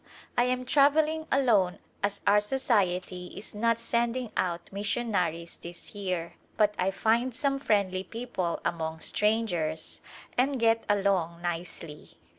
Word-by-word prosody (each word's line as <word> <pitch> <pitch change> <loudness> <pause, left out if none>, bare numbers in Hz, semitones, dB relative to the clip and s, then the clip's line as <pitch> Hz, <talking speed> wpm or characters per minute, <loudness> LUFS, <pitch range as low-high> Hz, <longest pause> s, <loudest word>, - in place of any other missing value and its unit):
I 245 - +4
am 255 0 0
travelling 305 +4 +3
alone 215 -10 +3 0.2
as 200 0 -1
our 205 +1 +6
Society 190 -6 0
is 205 - -8
not 230 +2 +2
sending 235 0 0
out 175 +1 -2
missionaries 195 -5 -1
this 170 0 -9
year, 180 -4 -3 0.2
but 210 -1 +4
I 185 - +2
find 230 +5 +1
some 275 0 0
friendly 200 -7 +1
people 195 -5 -3
among 160 -1 -2
strangers 180 -8 0 0.4
and 270 +1 +2
get 225 0 +3
along 190 -4 +1
nicely. 170 -3 -5
205 Hz, 125 wpm, -29 LUFS, 180-240 Hz, 0.4 s, our